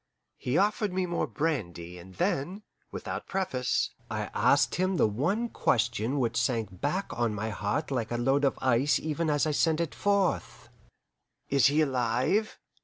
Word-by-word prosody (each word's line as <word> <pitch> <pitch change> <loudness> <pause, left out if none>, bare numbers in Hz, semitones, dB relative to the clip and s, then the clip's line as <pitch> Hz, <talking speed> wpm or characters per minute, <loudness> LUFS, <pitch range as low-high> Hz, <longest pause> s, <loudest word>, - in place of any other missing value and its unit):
He 125 +5 0
offered 210 0 +2
me 185 0 0
more 170 -3 -1
brandy, 90 - -3
and 95 +1 -13
then, 175 - -1 0.3
without - - -6
preface, 150 -10 -1 0.2
I - - -3
asked - - +3
him 185 +1 0
the - - +4
one 170 - 0
question 120 - 0
which 120 -2 0
sank 110 -7 -2
back 185 +7 0
on 115 -2 0
my 110 +2 -3
heart 120 +9 -2
like 120 -5 -1
a 120 - -2
load 135 +4 +2
of 140 - +2
ice 130 +3 +3
even 155 +1 -2
as 145 0 +2
I 155 - +1
sent 160 +2 +2
it 170 -3 -2
forth. 200 -2 0 0.8
"Is 140 -1 +5
he 150 +2 +3
alive?" 130 - +1
140 Hz, 165 wpm, -28 LUFS, 115-170 Hz, 0.8 s, Is